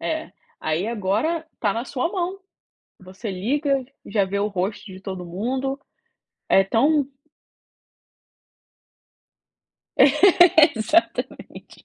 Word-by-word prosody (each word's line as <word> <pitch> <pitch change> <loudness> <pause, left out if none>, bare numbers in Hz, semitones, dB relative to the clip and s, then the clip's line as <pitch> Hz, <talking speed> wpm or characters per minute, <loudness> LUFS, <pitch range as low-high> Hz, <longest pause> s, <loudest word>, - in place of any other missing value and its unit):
É. - - -3 0.3
Aí 160 +5 -1
agora, 230 - -1
está 205 -3 -1
na 230 +3 -3
sua 270 +3 -2
mão. 370 0 -3 0.6
Você 190 +4 -8
liga 275 +8 0 0.2
e - - -11
já 205 -2 +2
vê 200 +1 -3
o 205 - +1
rosto 200 +1 -3
de 190 -2 -11
todo 190 -2 -6
mundo. 255 +10 -3 0.7
É 195 - +5
tão 280 +9 +2 2.9
Exatamente 320 - +3
230 Hz, 100 wpm, -23 LUFS, 195-295 Hz, 2.9 s, É